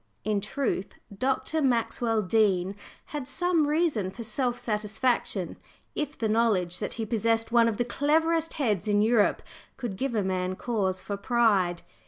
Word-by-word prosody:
In 210 -1 0
truth, 210 -2 -2 0.2
Dr. 270 +7 0
Maxwell 230 -3 +1
Dean 195 -2 +2 0.4
had 290 -4 -4
some 345 -1 +1
reason 295 - +1
for 230 +5 -8
self 245 +2 -1
satisfaction, 215 -2 -1 0.4
if 295 -1 -3
the 225 - 0
knowledge 210 -6 +1
that - - -3
he 225 - -3
possessed 225 +1 +1
one 235 -1 +5
of 220 -3 -1
the 240 - 0
cleverest 320 +5 +1
heads 215 - 0
in 205 0 +3
Europe 220 -2 +3 0.3
could 235 -7 -4
give 260 +1 -2
a 210 - +1
man 185 0 -1
cause 190 -5 -1
for 200 - -4
pride. 200 -6 +2
225 Hz, 155 wpm, -27 LUFS, 200-260 Hz, 0.4 s, one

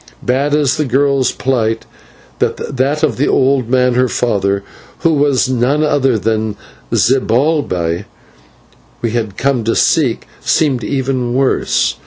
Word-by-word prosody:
Bad 135 +4 0
as - - +3
was 140 -4 +1
the 155 - 0
girl's 135 0 +1
plight, 115 -4 -1 0.5
that 140 +4 -1
of 145 -8 +1
the 140 - +1
old 130 -3 +2
man 125 0 +2
her 125 +1 +2
father, 100 -5 0 0.4
who 165 - +2
was 145 -3 +2
none 130 +4 +1
other 135 -5 +2
than 110 +1 -1 0.3
the - - 0
Zibalbay 115 - +1 1.0
we 115 - 0
had 110 -4 -3
come 135 -3 0
to 115 - +1
seek, 140 -8 +1
seemed 135 -7 +1
even 130 -2 -1
worse. 130 - +1
130 Hz, 140 wpm, -15 LUFS, 115-140 Hz, 1.0 s, as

